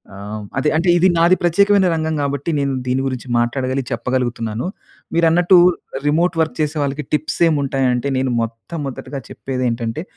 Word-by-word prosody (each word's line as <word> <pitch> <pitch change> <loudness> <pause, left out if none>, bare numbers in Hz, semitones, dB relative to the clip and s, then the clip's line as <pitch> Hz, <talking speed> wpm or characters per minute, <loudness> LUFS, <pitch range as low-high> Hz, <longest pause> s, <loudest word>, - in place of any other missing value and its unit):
ఆహ్, 105 +2 -7
అదే 150 +3 +2
అంటే 175 +3 +1
ఇది 180 +2 +4
నాది 170 +2 +5
ప్రత్యేకమైన 200 +2 +4
రంగం 160 0 -1
కాబట్టి 140 +3 -2
నేను 140 -1 0
దీని 130 +1 +1
గురించి 130 -1 -5
మాట్లాడగలిగి 130 +2 -1
చెప్పగలుగుతున్నాను. 120 -2 -2 0.5
మీరన్నట్టు 170 +2 +4 0.5
రిమోట్ 165 +5 +2
వర్క్ 160 - -1
చేసే 155 +1 -1
వాళ్ళకి 140 +1 -3
టిప్స్ 150 0 -1
ఏమి 155 - +1
ఉంటాయి 135 -1 0
అంటే, 125 +3 -2
నేను 130 -1 0
మొట్టమొదటిగా 135 +4 -6
చెప్పేదేంటంటే 125 +1 -3
140 Hz, 150 wpm, -19 LUFS, 125-160 Hz, 0.5 s, నాది